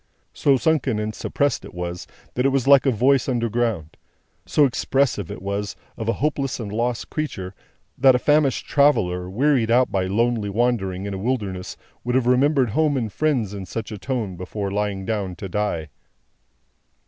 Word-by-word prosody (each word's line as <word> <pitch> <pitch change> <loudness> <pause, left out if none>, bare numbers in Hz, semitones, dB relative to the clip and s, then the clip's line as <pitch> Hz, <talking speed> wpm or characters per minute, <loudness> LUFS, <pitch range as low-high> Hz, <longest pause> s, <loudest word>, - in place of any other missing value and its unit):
So 140 -2 +3
sunken 135 -4 +1
and 105 0 -2
suppressed 145 +5 -1
it - - -11
was, 90 0 -5 0.3
that 125 - 0
it 135 - +4
was 135 -1 0
like 140 0 +6
a - - +5
voice 130 +4 +2
underground. 115 - -1 0.5
So 150 - +4
expressive 130 -6 0
it - - -7
was, 100 +1 -3 0.2
of 110 -1 -3
a - - +3
hopeless 140 -3 -1
and 105 -4 -5
lost 120 +2 -2
creature, 95 -12 -4 0.5
that 130 0 +6
a - - +4
famished 145 0 +2
traveller, 90 -12 +2
wearied 125 +2 +2
out 125 +2 +3
by 95 -1 0
lonely 110 +1 0
wandering 100 -4 0
in 100 - -4
a 95 - -4
wilderness, 100 -6 -3 0.3
would 125 +1 -1
have 130 -2 +2
remembered 130 -1 +3
home 150 +2 +2
and 115 -5 -3
friends 130 -10 0
in 95 -2 -6
such 110 +4 -5
a 105 - -5
tone 115 -8 -3
before 95 +3 -4
lying 100 -1 -2
down 100 -4 -2
to 95 - -6
die. 90 -5 -2
115 Hz, 175 wpm, -23 LUFS, 100-130 Hz, 0.5 s, like